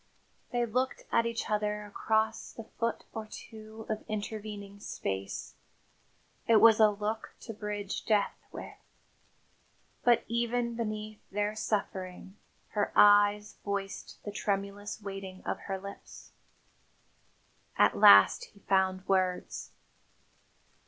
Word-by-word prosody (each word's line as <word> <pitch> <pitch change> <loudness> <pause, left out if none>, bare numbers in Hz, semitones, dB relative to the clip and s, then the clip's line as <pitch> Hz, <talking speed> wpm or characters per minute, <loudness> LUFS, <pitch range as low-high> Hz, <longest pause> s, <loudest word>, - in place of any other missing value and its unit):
They 240 -1 +1
looked 255 +3 -1
at 230 - +3
each 230 0 -3
other 210 0 -1
across 220 +1 0
the 225 - -8
foot 230 +1 -3
or 220 -1 -5
two 220 0 -10
of 215 -1 -3
intervening 205 -1 -5
space. 95 - -4 0.9
It 230 - +6
was 220 0 +7
a 215 -1 +7
look 210 +2 -4
to 225 - -7
bridge 210 -1 -4
death 210 -2 +2 0.2
with. - - -8 1.3
But 240 -1 +4
even 235 0 0
beneath 215 -2 -4
their 205 +1 -1
suffering, 190 -3 -3 0.3
her 205 -1 -1
eyes 205 0 +5
voiced 200 -1 -4
the 205 - -5
tremulous 200 0 -3
waiting 195 -1 -7
of - - -2
her 195 - -1
lips. 190 - -11 1.5
At - - +5
last 100 0 +8
he 200 - -21
found 190 -1 +1
words. 185 -2 0
210 Hz, 115 wpm, -30 LUFS, 200-220 Hz, 1.5 s, last